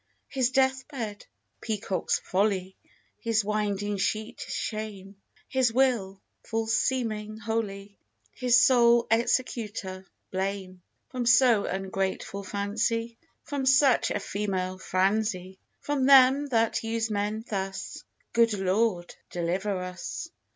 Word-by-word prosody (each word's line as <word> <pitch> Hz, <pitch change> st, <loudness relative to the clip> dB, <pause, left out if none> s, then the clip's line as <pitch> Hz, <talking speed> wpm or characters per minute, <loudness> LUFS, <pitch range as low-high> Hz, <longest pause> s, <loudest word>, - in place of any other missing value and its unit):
His 260 Hz, -3 st, +1 dB
death 265 Hz, 0 st, +1 dB
bed, 225 Hz, -8 st, -6 dB, 0.3 s
peacock's 205 Hz, -4 st, -1 dB
folly; 190 Hz, -1 st, -1 dB, 0.4 s
His 225 Hz, -3 st, 0 dB
winding 205 Hz, -1 st, -1 dB
sheet 215 Hz, +3 st, -2 dB
is -, -, -5 dB
shame; 205 Hz, -3 st, -5 dB, 0.3 s
His 260 Hz, -3 st, +2 dB
will, 225 Hz, -7 st, +1 dB, 0.2 s
false 225 Hz, 0 st, -1 dB
seeming 215 Hz, -5 st, -1 dB
holy; 210 Hz, -3 st, -4 dB, 0.3 s
His 245 Hz, -1 st, +4 dB
sole 240 Hz, -2 st, +5 dB
executor, 215 Hz, -5 st, -1 dB, 0.2 s
blame. 190 Hz, -1 st, -3 dB, 0.3 s
From 250 Hz, -2 st, -3 dB
so 235 Hz, -2 st, +5 dB
ungrateful 195 Hz, +1 st, -3 dB
fancy, 220 Hz, +4 st, -2 dB, 0.2 s
From 280 Hz, -3 st, -3 dB
such 270 Hz, -1 st, +5 dB
a -, -, -1 dB
female 190 Hz, -2 st, -3 dB
franzy, 190 Hz, 0 st, 0 dB, 0.2 s
From 280 Hz, -3 st, 0 dB
them 275 Hz, +1 st, +7 dB
that 230 Hz, -4 st, +1 dB
use 225 Hz, 0 st, -1 dB
men 210 Hz, +2 st, -2 dB
thus, 195 Hz, -2 st, -4 dB, 0.3 s
Good 230 Hz, -1 st, +4 dB
Lord, 190 Hz, -1 st, 0 dB, 0.2 s
deliver 185 Hz, +3 st, -1 dB
us! 180 Hz, 0 st, -6 dB
215 Hz, 110 wpm, -27 LUFS, 195-235 Hz, 0.4 s, them